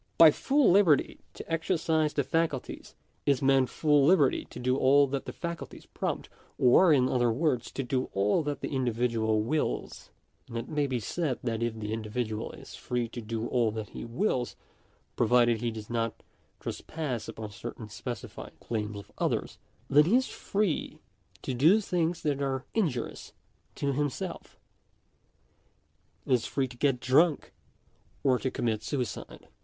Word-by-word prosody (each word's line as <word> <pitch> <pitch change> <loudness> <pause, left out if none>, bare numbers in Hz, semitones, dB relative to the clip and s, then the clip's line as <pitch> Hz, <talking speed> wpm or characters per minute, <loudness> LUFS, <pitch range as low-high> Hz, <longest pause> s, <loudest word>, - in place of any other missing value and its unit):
By 165 -2 +9
full 275 - +3
liberty 175 -7 +4 0.2
to - - -9
exercise 160 -2 +1
the 145 - +2
faculties, 145 -1 -2 0.3
is 140 0 +2
meant 135 -1 +4
full 150 -3 +3
liberty 145 -3 +4
to - - -12
do 125 +1 +1
all 140 +2 +5
that 140 0 -3
the - - -5
faculties 170 -1 -6
prompt, - - -3 0.3
or, 145 +8 +6
in 130 -4 +4
other 120 -2 +2
words, 130 0 0
to 135 - -2
do 130 +1 -1
all 100 - +2
that 145 -1 -3
the - - -3
individual 115 -3 +1
wills; 150 +7 -2 0.4
and 115 - -6
it 115 - -4
may 150 -2 0
be 130 -2 -1
said, 140 - -2
that 115 -2 -2
if 115 -1 -1
the 105 0 -3
individual 110 0 -3
is - - -12
free 125 -1 -2
to 120 - -7
do 115 +1 -3
all 120 -3 +2
that 110 -1 -5
he - - -7
wills, 125 - -1 0.6
provided 120 -1 +3
he 120 - 0
does 110 -2 -7
not 115 -1 -2 0.4
trespass 145 -8 -4
upon 110 -1 -7
certain 110 +1 -7
specified 120 +3 -7
claims 105 -2 -3
of 100 -1 -11
others, - - -1 0.3
then 145 +2 +6
he 195 +8 +3
is 260 +1 +3
free 200 -5 -2 0.5
to 130 - -2
do 160 - +5
things 175 -4 -1
that 145 -3 0
are 135 -1 -1
injurious 155 - -2 0.4
to 140 -1 -1
himself— 145 -1 -3 1.7
is 125 -3 +1
free 135 -2 0
to 125 - -12
get 135 0 +1
drunk, 145 +5 +3 0.7
or 130 -3 +3
to 130 - -1
commit 110 -4 -1
suicide. 125 -1 -4
130 Hz, 160 wpm, -29 LUFS, 115-150 Hz, 1.7 s, By